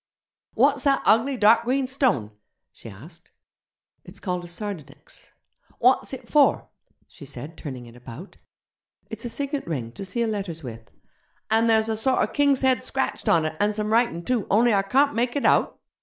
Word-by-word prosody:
'What's 275 +3 +2
that 275 -1 +2
ugly 245 +5 +3
dark 225 +1 +5
green 260 +3 0
stone?' 250 - 0 0.4
she - - -12
asked. 155 - -14 0.7
'It's - - -13
called 180 -3 -3
a - - -9
sardonyx.' 175 -6 -8 0.5
'What's - - +2
it - - -8
for?' - - +3 0.4
she - - -14
said, 160 +4 -9
turning 130 -6 -8
it 120 0 -15
about. 125 - -11 0.7
'It's 225 +2 -7
a - - -3
signet 280 - -4
ring, 125 -8 -4
to 195 - -9
seal 225 +5 -2
letters 190 -7 -5
with.' 115 -3 -9 0.6
'An' 225 +1 +3
there's 220 -1 +3
a 220 - -1
sorter 260 +4 +1
king's 285 -2 +1
head 260 -1 +2
scratched 265 - -2
on 160 -2 +3
it, 155 0 -3
an' 210 +1 +1
some 210 +1 -2
writin' 225 -8 +1
too, 245 -5 -1
only 230 +3 +3
I 200 - +3
carnt 270 +9 +2
make 240 +2 -1
it 285 - -1
out?' - - +2
215 Hz, 175 wpm, -24 LUFS, 165-250 Hz, 0.7 s, dark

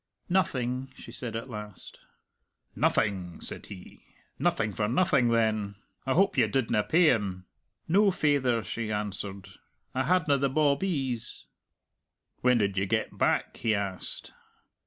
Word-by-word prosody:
"Nothing!" 130 -8 0
she - - -10
said 115 -3 -5
at 115 +3 -4
last. 105 -5 -9 0.8
"Nothing!" 95 -5 0
said - - -5
he. 95 -3 -12 0.4
"Nothing 105 - +1
for 105 +2 -1
nothing, 140 - +3
then. 110 -3 +1 0.3
I 130 - +2
hope 195 +6 +3
you 120 -4 +5
didna 115 -2 +1
pay 160 - +5
him?" 95 -4 -2 0.4
"No, 200 +5 +5
faither," 140 - +1
she 115 -1 -4
answered. 100 -2 -4 0.5
"I 130 0 0
hadna 155 -4 +3
the 140 0 +2
bawbees." 140 -4 0 0.9
"When 125 -1 +3
did 100 -3 +1
ye 100 - 0
get - - -1
back?" - - +1
he 110 -2 +1
asked. 100 -2 -3
115 Hz, 135 wpm, -28 LUFS, 105-140 Hz, 0.9 s, you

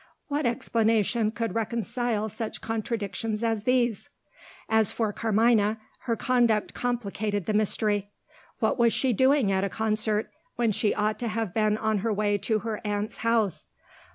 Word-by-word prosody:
What 290 -2 0
explanation 225 -1 +1
could 225 -2 -3
reconcile 230 0 -1
such 220 +1 -5
contradictions 220 -1 -3
as 225 -2 0
these? 245 -4 +1 0.6
As 220 -2 +3
for 220 -3 -1
Carmina, 220 -1 +2 0.3
her 230 - +1
conduct 235 -3 +1
complicated 215 -5 -2
the 215 - -1
mystery. 210 -1 +1 0.5
What - - 0
was 235 -1 +4
she 260 -2 +2
doing 260 -2 +3
at 190 0 +1
a 200 - 0
concert, 215 0 -1 0.2
when 235 -2 +1
she 210 +1 +1
ought 210 +1 0
to 240 - -2
have 220 -4 -2
been 215 -1 +2
on 220 -1 0
her 225 +3 -1
way 205 0 +1
to 220 0 0
her 220 -2 -3
aunt's 210 0 -2
house? 220 -8 0
220 Hz, 155 wpm, -27 LUFS, 210-230 Hz, 0.6 s, was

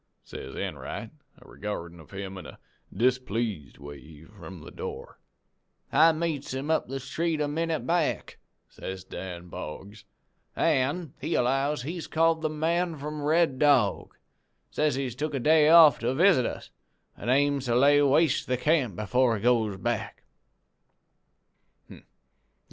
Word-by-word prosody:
says - - -9
Enright, - - -5 0.3
a - - -18
regardin' 85 -5 -6
of 80 - -15
him 95 -1 -7
in 95 - -9
a - - -12 0.3
displeased 115 - -1
way 75 +1 -12
from 95 -2 -12
the - - -11
door. - - -8 0.7
"'I 160 +3 +6
meets 155 -5 -3
him 140 +4 -3
up 160 - +1
the 135 +2 -4
street 160 +4 -2
a 150 - 0
minute 160 +2 -2
back,' 170 -2 -1 0.3
says 95 0 -8
Dan 90 -2 -8
Boggs, 100 +7 -8 0.5
'an' 150 +1 0
he 155 +5 -1
allows 135 +2 0
he's 165 +4 -5
called 165 0 +2
"The 155 - 0
Man 165 +2 -1
from 150 +1 -6
Red 155 -2 +2
Dog." 140 -9 +2 0.6
He - - -25
says 150 -3 +2
he's 130 -3 -3
took 150 +4 -3
a - - -1
day 155 +3 +4
off 165 -3 +8
to 120 +3 -1
visit 170 -5 +4
us, - - -8 0.4
an' - - -6
aims 140 +1 +2
to 120 -1 0
lay 145 +3 +5
waste 145 +2 +2
the 125 - 0
camp 145 - +1
some 105 +4 -5
before 125 +2 +2
he 100 - -9
goes 115 -5 +2
back.' 120 +3 -3
135 Hz, 150 wpm, -27 LUFS, 110-155 Hz, 0.7 s, off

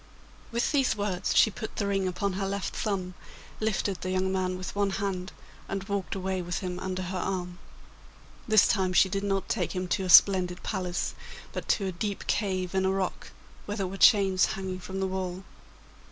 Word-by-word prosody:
With 235 0 0
these 275 -5 +2
words 200 -3 -1
she 220 - +6
put 220 +3 -7
the 205 - -1
ring 195 -1 0
upon 195 +2 -1
her 195 +1 -2
left 200 0 -3
thumb, 185 -3 -2 0.5
lifted 205 -3 -1
the 185 - -3
young 185 0 0
man 185 -1 -1
with 185 +1 -6
one 200 -1 +2
hand, 190 -2 -3 0.4
and 195 -1 -3
walked 200 -1 -3
away 190 -1 -2
with 175 0 -3
him 180 -1 -4
under 185 0 -3
her 185 +1 -4
arm. 180 -2 -3 0.9
This 215 -2 +6
time 185 -3 +1
she 190 - +5
did 195 +1 -2
not 195 -1 -1
take - - -1
him 185 -1 -2
to 190 - 0
a - - -4
splendid 180 0 +6
palace, 180 -3 -2 0.4
but - - -5
to 200 - +1
a 190 - -1
deep 200 +3 -4
cave 185 -3 -1
in 190 0 +1
a 190 - +2
rock, 190 -1 -2 0.4
where 205 +1 -3
there 195 - -1
were 185 +1 -5
chains 195 -2 +5
hanging 190 -1 -4
from 190 +1 -5
the - - +1
wall. 185 0 -4
190 Hz, 195 wpm, -28 LUFS, 185-200 Hz, 0.9 s, she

